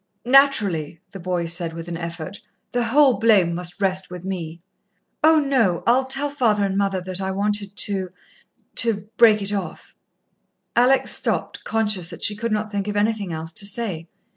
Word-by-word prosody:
"Naturally," 210 - +3
the 195 - -9
boy 175 -1 -2
said 170 0 -2
with 165 0 -8
an 170 - -5
effort, 170 +3 -7 0.3
"the 245 -1 0
whole 265 +2 +4
blame 200 -7 +4
must 175 +2 -5
rest 190 -1 -1
with 180 0 -9
me." 170 -4 -5 0.6
"Oh, 315 0 +6
no, 255 - +1
I'll 255 +3 +3
tell 270 +2 +1
father 225 -8 +1
and 195 -1 -2
mother 195 -2 0
that 185 +1 -2
I 190 - -2
wanted 200 +1 -1
to 190 -3 0 0.7
to 215 -4 0
break 215 -3 +5
it 200 +1 -2
off." 190 -5 -6 0.8
Alex 255 +3 +3
stopped, - - -2
conscious 210 -6 -1
that 170 - -8
she 210 - +5
could 230 +2 -3
not 215 0 -2
think 200 -1 -3
of 205 0 -2
anything 210 -3 0
else 160 0 -6
to 200 - +1
say. 190 -6 -2
200 Hz, 175 wpm, -22 LUFS, 180-225 Hz, 0.8 s, Oh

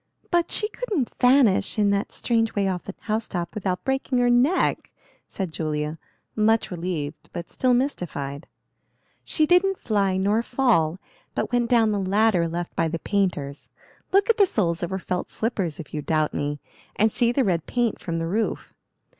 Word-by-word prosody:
"But 345 -1 +2
she 425 - 0
couldn't 415 - -3
vanish 250 -6 +4
in 205 -1 +3
that 200 +1 -1
strange 225 -2 0
way 200 -1 +1
off 180 -2 -1
the 195 - -7
house 220 0 -2
top 175 -3 -4
without 190 -4 -2
breaking 265 -1 0
her 245 0 +3
neck," 260 +9 +2 0.4
said 190 -4 -4
Julia, 155 0 -3 0.4
much 220 0 +2
relieved, 165 -4 -4
but 170 -1 -6
still 255 -1 +2
mystified. 165 - -3 0.8
"She 310 - +2
didn't 360 +3 +3
fly 200 -4 0
nor 205 +4 +2
fall, 235 -11 +2 0.4
but - - -2
went 240 -1 +2
down 230 -3 +4
the 205 - 0
ladder 195 -2 +2
left 170 +1 -4
by 165 - +1
the 165 +1 -2
painters. 165 -8 -2 0.4
Look 395 +1 +4
at 460 -1 +3
the 400 -3 +5
soles 170 - 0
of 175 - -2
her 190 - -2
felt 180 -1 -3
slippers, 195 -9 -2
if 160 - -9
you 150 - -2
doubt 155 0 0
me, 145 0 -2 0.4
and 220 +1 +3
see 235 +1 +2
the 265 +2 +2
red 170 -6 0
paint 240 -3 0
from 165 -2 -3
the 165 - -2
roof. 210 +6 -2
200 Hz, 180 wpm, -24 LUFS, 170-245 Hz, 0.8 s, the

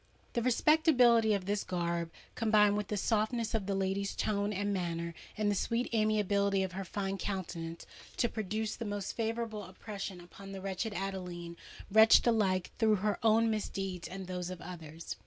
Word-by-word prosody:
The 235 - +1
respectability 250 -4 +4
of 190 -2 -3
this 205 +1 0
garb 170 -2 -2 0.2
combined 210 -3 +4
with 210 -1 -2
the 210 - -2
softness 220 +3 0
of 210 -4 -1
the 200 - 0
lady's 195 +1 -1
tone 205 0 0
and 205 0 -1
manner, 170 -2 -2 0.2
and 210 -1 +2
the - - +2
sweet 230 +5 -1
amiability 200 -3 +2
of 190 - -3
her 195 +2 -4
fine 195 +1 -3
countenance, 170 -3 -4 0.3
to 240 - +3
produce 215 0 -3
the 235 - -5
most 205 -2 -3
favourable 225 -2 -3
impression 195 -1 -6
upon 195 +3 -11
the 195 - -5
wretched 195 +3 -3
Adeline,—wretched 185 +3 +2
alike 195 -6 +2
through 220 -2 +4
her 205 +1 -1
own 225 0 +4
misdeeds 195 -4 -3
and 190 0 -7
those 180 -1 -4
of 185 -1 -6
others! 165 -2 -8
200 Hz, 165 wpm, -32 LUFS, 185-220 Hz, 0.3 s, respectability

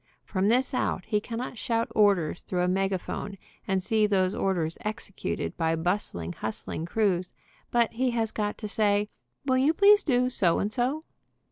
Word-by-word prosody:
From 190 -1 0
this 250 +5 +2
out 190 -6 -1
he 210 -1 0
cannot 235 +1 -5
shout 230 -1 0
orders 195 -7 +3
through 180 -1 -1
a - - +2
megaphone, 195 +1 -2 0.3
and 190 -1 0
see 215 0 +2
those 190 -2 +2
orders 175 -5 -1
executed 215 -2 -4
by 165 -1 +1
bustling, 160 - -2
hustling 110 - -5
crews, 185 -3 0 0.4
but 235 -1 +2
he 255 +3 +1
has 225 -2 -1
got 210 -1 -2
to 215 - -5
say, 205 -1 +1 0.4
"Will 260 -1 +2
you 295 +5 +3
please 410 +2 +6
do 250 -3 +2
so 175 -8 +3
and 210 +2 -1
so?" 265 +5 0
210 Hz, 165 wpm, -27 LUFS, 185-235 Hz, 0.4 s, please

